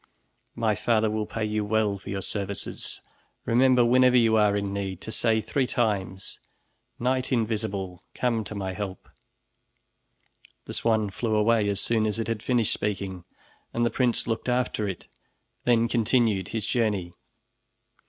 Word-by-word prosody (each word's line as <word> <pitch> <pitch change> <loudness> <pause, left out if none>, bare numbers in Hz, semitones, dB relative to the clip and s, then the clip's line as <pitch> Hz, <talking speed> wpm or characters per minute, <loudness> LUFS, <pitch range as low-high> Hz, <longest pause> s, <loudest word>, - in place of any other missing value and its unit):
My 115 -2 +1
father 110 +1 +1
will 110 -1 -2
pay 110 -1 -2
you 105 0 -1
well 105 -1 +1
for - - -10
your 95 -1 -3
services. 100 -1 -4 0.5
Remember 125 +1 +4
whenever 125 +1 +5
you 115 -2 +4
are 105 -2 +4
in 100 -1 -2
need, 95 -2 -3
to 110 - -7
say 110 -1 +1
three 125 +5 0
times: 100 -5 -2 0.6
'Knight 130 +2 0
Invisible, 105 -6 -1
come 115 -3 0
to 105 - -7
my 95 -2 -3
help!'" 100 -1 -6 1.6
The - - -7
swan 110 -3 +1
flew 110 +2 -1
away 105 -1 +3
as 100 -1 -1
soon 110 -2 +1
as 105 - -1
it 115 -2 -2
had 115 -2 -2
finished 120 -3 +1
speaking, 95 -3 -3 0.5
and 120 0 +2
the 115 - +1
prince 125 -3 +1
looked 115 +2 -2
after 125 -4 0
it, 95 - -6 0.6
then 115 -1 +4
continued 115 -4 +2
his 110 0 -3
journey. 105 -8 0
110 Hz, 155 wpm, -26 LUFS, 100-115 Hz, 1.6 s, whenever